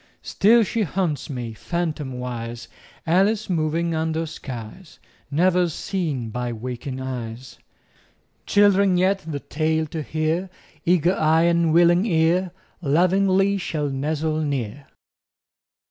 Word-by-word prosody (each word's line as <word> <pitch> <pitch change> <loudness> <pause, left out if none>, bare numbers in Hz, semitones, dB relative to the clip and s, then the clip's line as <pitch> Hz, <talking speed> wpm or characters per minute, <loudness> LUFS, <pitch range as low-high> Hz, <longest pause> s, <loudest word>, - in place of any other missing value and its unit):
Still 225 +4 +4
she 225 +2 -2
haunts 180 -6 -1
me, 120 -5 -5
phantomwise, 125 - -4 0.4
Alice 195 +5 +2
moving 165 0 0
under 160 0 -1
skies 135 - -9 0.3
Never 175 +4 +2
seen 155 - -3
by 125 +1 -3
waking 125 +3 -5
eyes. 125 -1 -6 0.9
Children 200 -2 +4
yet, 190 +2 +2
the 155 -5 -5
tale 160 +2 -1
to 155 +1 -5
hear, 160 +5 -1 0.4
Eager 175 0 +3
eye 160 0 +3
and 170 -1 +3
willing 175 +4 +4
ear, 175 +1 +2 0.3
Lovingly 190 +5 +2
shall 150 -5 -2
nestle 155 +3 -1
near. 140 -2 -3
160 Hz, 110 wpm, -23 LUFS, 140-180 Hz, 0.9 s, Still